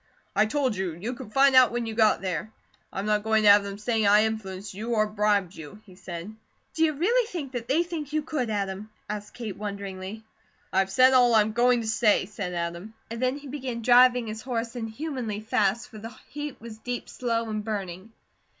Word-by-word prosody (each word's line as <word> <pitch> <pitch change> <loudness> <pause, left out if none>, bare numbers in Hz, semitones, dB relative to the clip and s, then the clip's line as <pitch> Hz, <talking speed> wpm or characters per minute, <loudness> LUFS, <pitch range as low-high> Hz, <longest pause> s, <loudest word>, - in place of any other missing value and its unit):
"I 215 +2 +4
told 260 -1 0
you, 185 -3 -2
you 205 +10 -5
could 225 -4 -10
find 270 +2 +5
out 255 -1 +7
when 240 0 -2
you 225 - -4
got 220 -1 +3
there. 185 +2 -3 0.4
I'm 195 - -4
not 210 0 +2
going 220 0 +2
to 210 - +7
have 205 0 +7
them 200 0 -6
saying 220 0 0
I 210 +1 +6
influenced 205 -3 -5
you, 225 +4 -3
or 215 -1 +3
bribed 205 -3 +1
you," 160 +6 -10
he 190 - -15
said. 180 +2 -8 0.4
"Do 320 - +1
you 310 -1 +3
really 440 - +2
think 320 - -5
that 240 -2 -5
they 315 +6 +2
think 325 -5 -6
you 310 0 0
could, 290 -6 -2
Adam?" 200 0 -3 0.2
asked 210 0 -6
Kate, 220 -6 -5
wonderingly. 200 0 -6 0.5
"I 190 - +3
have 195 0 +1
said 255 +6 +5
all 245 -2 +5
I'm 215 0 +4
going 240 +1 +3
to 225 - -5
say," 220 -3 +3
said 190 -2 -5
Adam, 170 +5 -4 0.2
and 230 +1 -5
then 255 +2 +1
he 290 0 -11
began 255 -4 -5
driving 245 0 +6
his 220 0 -6
horse 235 -1 -3
inhumanely 235 -1 -4
fast, 215 +1 0
for 215 - -11
the 225 +1 -9
heat 295 -1 -6
was 220 -1 -10
deep, 245 +2 -5
slow, 230 -2 -2
and 215 -1 -3
burning. 200 -1 -5
220 Hz, 215 wpm, -26 LUFS, 205-250 Hz, 0.5 s, out